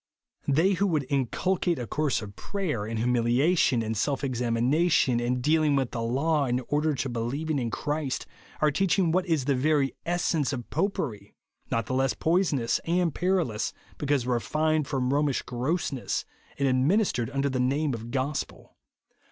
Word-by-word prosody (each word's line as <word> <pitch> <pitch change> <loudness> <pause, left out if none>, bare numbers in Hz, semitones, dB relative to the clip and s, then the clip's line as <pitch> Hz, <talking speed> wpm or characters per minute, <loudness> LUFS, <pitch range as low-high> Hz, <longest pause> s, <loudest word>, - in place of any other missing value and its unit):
They 160 +8 +3
who 200 +2 +1
would 155 -6 0
inculcate 170 +6 0
a 125 - -4
course 140 0 0
of 100 -1 -9
prayer, 155 - -3
and 115 0 -3
humiha 125 +7 +2
tion, 125 -8 +3
and 110 0 -2
self 140 +6 -1
examination, 125 +2 +2
and 125 +1 -1
dealing 155 0 +3
with 135 -3 0
the 115 - -3
law, 140 +6 +1
in 125 -1 0
order 150 +1 +1
to 135 +1 -2
believing 135 +6 -2
in 120 -2 -1
Christ, 145 +2 -2 0.4
are 155 -1 +4
teaching 180 +1 +2
what 185 +2 +1
is 160 -6 +1
the 140 - +2
very 140 +1 +2
essence 170 -4 0
of 120 -3 -5
Popery; 135 - -2 0.3
not 115 - 0
the - - -4
less 130 0 +1
poisonous 160 -8 +1
and 170 -1 +1
peril 180 -7 +1
ous, 105 +1 -3 0.3
because 145 -4 +1
refined 155 +5 0
from 130 -2 0
Romish 145 -2 +1
gross 130 +8 -1
ness, 130 -3 -3 0.3
and 140 - +1
administered 130 - +2
under 140 0 0
the 130 -2 -1
name 140 +3 +1
of 115 0 -6
gospel. 135 +3 -4
140 Hz, 170 wpm, -27 LUFS, 125-160 Hz, 0.4 s, are